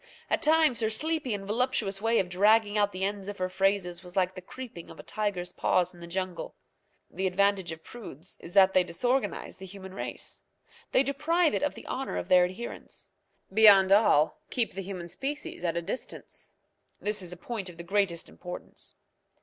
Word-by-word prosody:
At - - +2
times 310 -4 +4
her 220 - +2
sleepy 310 +3 0
and 200 -2 -3
voluptuous 210 -3 0
way 230 +1 +2
of 185 - +2
dragging 205 +3 +4
out 205 -1 +3
the 185 0 -4
end 200 0 -2
of 205 - -6
her 185 0 -1
phrases 190 -1 0
was 180 0 -12
like 185 -1 +2
the 185 - -8
creeping 220 -3 -9
of - - -12
a - - -8
tiger's 200 -5 -2
paws 180 0 +1
in 175 - -15
the 170 - -9
jungle. 185 0 -4 0.6
The 190 0 -1
advantage 190 -1 +2
of 160 0 -8
prudes 190 - -9
is 170 - -10
that 190 -1 +7
they 185 - +5
disorganize 245 +5 -1
the 190 - -8
human 190 0 -10
race. - - -6 0.5
They 260 - +5
deprive 305 +5 +2
it - - 0
of 290 -1 0
the - - -10
honour 265 +1 -3
of - - -4
their 180 -1 +7
adherence. 185 +7 -7 0.4
Beyond 200 -3 +7
all, 200 - +4
keep 240 -3 0
the 195 - -4
human 185 -2 -6
species 280 - -5
at 170 -1 0
a 170 - -1
distance. 205 +9 -7 0.5
This 210 -1 -1
is 180 -2 -4
a 180 - -7
point 205 -1 -5
of 170 - -12
the 170 - -7
greatest 185 -2 0
importance. 180 0 -9
195 Hz, 195 wpm, -29 LUFS, 180-225 Hz, 0.6 s, that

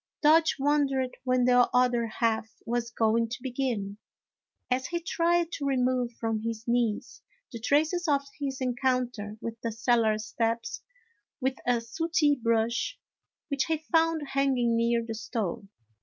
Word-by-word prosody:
Dodge 320 +2 +5
wondered 275 -2 +1
when 255 -1 +2
the 245 -1 +5
other 245 -2 +3
half 220 0 0 0.2
was 235 0 -1
going 230 0 +1
to 240 +2 -6
begin, 240 -6 -2 0.7
as 255 +1 +1
he 345 - -2
tried 340 0 +1
to 285 -5 -3
remove 255 -2 +1
from 225 -1 -2
his 230 0 -4
knees 235 -3 -1 0.3
the 230 - -6
traces 315 +8 +1
of 280 -2 +2 0.2
his 275 -2 -3
encounter 250 -4 -1
with 230 0 -6
the 230 - -2
cellar 225 -1 +2
steps, 230 +1 -2 0.6
with 265 0 -1
a 240 -1 +2
sooty 300 +5 +1
brush 230 -2 0 0.5
which 280 -2 0
he 325 -1 0
found 325 -3 +2
hanging 265 -4 +2
near 235 0 +1
the 225 - -4
stove. 215 -3 -4
245 Hz, 140 wpm, -28 LUFS, 230-275 Hz, 0.7 s, Dodge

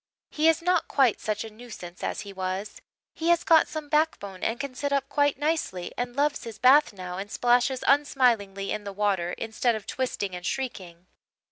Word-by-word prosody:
He 310 +1 +2
is 325 0 +3
not 360 +1 +2
quite 260 -6 +2
such 215 0 -2
a 225 - -9
nuisance 210 -6 -10
as - - -2
he 200 -1 -9
was; 190 +2 -4 0.3
he 330 +1 -2
has 345 0 +4
got 325 -1 +5
some 310 -2 -6
backbone 290 - -1
and 225 +1 -1
can 280 -2 -4
sit 285 +2 -3
up 275 -1 +1
quite 285 -1 +2
nicely, 290 - -2
and 245 0 -2
he 240 - -19
loves 290 +1 +1
his 225 -2 -8
bath 275 +5 +6
now 185 -2 -7
and 200 +1 -6
splashes 245 +3 +2
unsmilingly 235 -9 +2
in 215 0 -3
the 200 -1 -6
water 195 -4 0
instead 225 +1 -1
of 215 -2 -7
twisting 225 -7 -3
and 180 - -7
shrieking. 185 -9 -5
235 Hz, 200 wpm, -26 LUFS, 195-285 Hz, 0.3 s, bath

